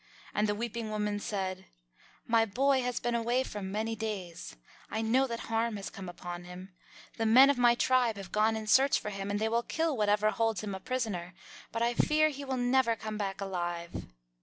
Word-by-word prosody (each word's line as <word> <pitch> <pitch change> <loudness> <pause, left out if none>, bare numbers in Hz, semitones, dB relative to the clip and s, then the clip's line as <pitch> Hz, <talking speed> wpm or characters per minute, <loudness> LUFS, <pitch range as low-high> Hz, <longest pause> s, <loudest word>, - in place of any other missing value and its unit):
And 210 0 +1
the 205 - +1
weeping 230 0 -4
woman 210 -1 -1
said, 190 -2 -3 0.6
"My 230 -1 +4
boy 260 +5 +2
has 245 -1 -2
been 240 - -1
away 235 +2 +1
for 210 -5 -6
many 215 +4 -2
days. 195 - -5 0.3
I 220 +1 -2
know 255 +4 +3
that 230 -2 -4
harm 225 -1 -1
has 195 - -6
come 190 -2 -8
upon 175 0 -7
him. 180 +2 -10 0.4
The 225 -1 +1
men 260 +5 +8
of 280 - -3
my 240 -1 +5
tribe 245 -3 +2
have 195 -1 -8
gone 215 +1 +2
in 220 - -5
search 265 +6 +4
of 210 - -3
him, 195 0 -4
and 205 0 -1
they 220 - +1
will 230 +1 +1
kill 320 +4 -1
whatever 210 -1 +2
holds 225 -4 0
him 205 -2 -4
a 190 - -5
prisoner, 190 -7 -3 0.4
but 230 +1 -1
I 235 +1 +2
fear 310 +5 +3
he 285 -1 -7
will 265 -1 -2
never 245 -1 +2
come 215 -1 -6
back 195 -1 -3
alive." 175 -3 -4
220 Hz, 210 wpm, -30 LUFS, 200-240 Hz, 0.6 s, men